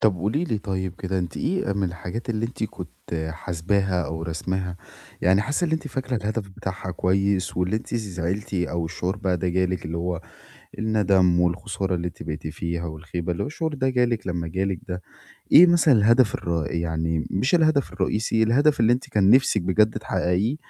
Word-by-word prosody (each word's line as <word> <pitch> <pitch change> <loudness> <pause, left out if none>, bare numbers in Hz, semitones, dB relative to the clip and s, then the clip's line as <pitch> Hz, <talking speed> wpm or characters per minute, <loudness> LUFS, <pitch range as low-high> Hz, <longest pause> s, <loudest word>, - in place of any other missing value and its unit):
طَب 110 -3 +4
قولي 105 - 0
لي 115 -11 -1
طيب 95 -3 -3
كده 95 0 -2
أنتِ 90 -2 -4
إيه 185 - -1
آآ - - +1
من 100 0 -1
الحاجات 100 +7 -5
اللي 115 0 -1
أنتِ 115 -2 -4
كنت 90 -4 -7 0.4
حاسباها 90 +3 -1
أو 80 0 -4
راسماها، 90 +3 -3 0.5
يعني 95 +3 +4
حاسّة 145 +9 0
اللي 160 -2 +1
أنتِ 160 - -4
فاكرة 130 -1 -2
الهدف 105 -1 -3
بتاعها 95 -1 -5
كويس 95 +1 0
واللي 90 +4 +1
أنتِ 115 - -6
زعلتِ 100 -1 -3
أو 85 -2 -1
الشعور 90 +3 -3
بقى 95 -2 0
ده 90 +1 -1
جالِك 90 0 0
اللي 80 +1 -4
هو 85 0 -2 0.6
الندم 100 -5 +3
والخسارة 95 +2 0
اللي 85 0 -2
أنتِ 85 - -9
بقيتِ 80 0 -5
فيها 85 +2 -3
والخيبة، 85 +2 -4
اللي 85 - -2
هو - - -3
الشعور 160 +1 -3
ده 130 -2 0
جالِك 120 -5 +1
لمّا 85 -2 -2
جالِك 95 +2 -1
ده 90 0 -4 0.5
إيه 180 - +10
مثلًا 170 -4 +5
الهدف 115 +1 +4
الر 85 -3 -2
يعني 80 -1 -1
مش 130 - +2
الهدف 155 - +2
الرئيسي، 110 +4 +1
الهدف 145 +7 +3
اللي 115 +1 +5
أنت 125 - -3
كان 100 -2 +3
نِفْسِك 125 -4 +5
بجد 105 +5 +2
تحققيه 95 +10 0
95 Hz, 185 wpm, -24 LUFS, 90-110 Hz, 0.6 s, إيه